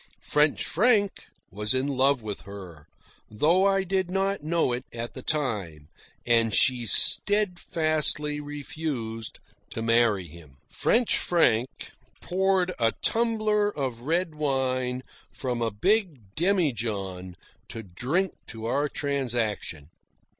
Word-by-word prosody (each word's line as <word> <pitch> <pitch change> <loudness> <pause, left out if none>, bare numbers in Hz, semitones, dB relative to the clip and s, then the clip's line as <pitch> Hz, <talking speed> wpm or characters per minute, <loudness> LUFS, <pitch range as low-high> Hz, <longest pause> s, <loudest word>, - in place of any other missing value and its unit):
French 150 0 +2
Frank 205 0 +2 0.2
was 105 +5 -1
in 130 +2 0
love 135 -2 +2
with 105 -2 -5
her, 90 -6 -11 0.4
though 165 - +3
I 195 -1 +2
did 190 -1 -1
not 195 0 -1
know 160 -4 0
it 125 - -3
at 115 0 -6
the 130 - -8
time; 105 - -3 0.4
and 115 -2 +2
she 125 -3 +3
steadfastly 155 - +3
refused 145 -6 -4 0.3
to 115 - -4
marry 115 -5 +2
him. 75 -4 -15
French 240 0 +2
Frank 130 -8 +1 0.3
poured 185 0 +1
a 115 -1 +2
tumbler 215 -2 +1
of 130 - -4
red 165 +5 -1
wine 130 -3 -1 0.3
from 125 -3 -3
a 115 - +1
big 145 - 0
demijohn 110 - -1 0.3
to 115 - -7
drink 130 - -1
to 110 -1 -8
our 145 +5 0
transaction. 120 - -2
135 Hz, 120 wpm, -26 LUFS, 115-175 Hz, 0.4 s, though